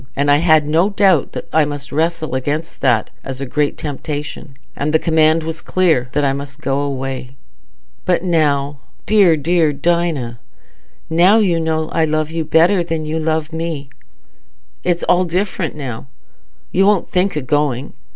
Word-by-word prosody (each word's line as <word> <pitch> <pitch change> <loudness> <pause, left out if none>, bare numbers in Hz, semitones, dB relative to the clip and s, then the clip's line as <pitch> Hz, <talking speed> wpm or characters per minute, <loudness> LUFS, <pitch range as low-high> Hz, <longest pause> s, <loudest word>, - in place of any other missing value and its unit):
And 145 +1 +2
I 145 - +6
had 155 -1 +4
no 165 +6 +2
doubt 195 -6 +2
that - - -6
I 160 - +4
must 145 -1 -5
wrestle 160 0 -1
against 145 +5 -3
that 120 -5 +2
as 135 -1 -6
a 140 - -3
great 145 +2 -1
temptation, 150 -1 -6 0.2
and 150 +2 -2
the - - +6
command 160 0 +2
was 160 0 -5
clear 160 -9 +1
that 145 - +1
I 135 - +2
must 140 +1 -7
go 140 -3 -1
away." 135 -2 -4 0.7
"But 180 -1 +1
now, 145 -5 +1 0.3
dear, 195 -7 +4
dear 165 +1 +2
Dinah, 145 -6 -1 0.7
now 175 +6 +4
you 185 -6 +2
know 160 -1 -1
I 160 - +1
love 155 0 -1
you 165 0 -2
better 170 +4 +3
than 165 -2 -3
you 155 +1 -2
love 160 0 -1
me... 160 -4 -4 0.9
it's 175 -1 0
all 180 +1 +3
different 180 -1 -2
now. 125 - -6 0.6
You 195 +2 +3
won't 205 -4 +2
think 185 -2 +1
o' - - -1
going. 140 -1 -1
155 Hz, 165 wpm, -18 LUFS, 140-170 Hz, 0.9 s, I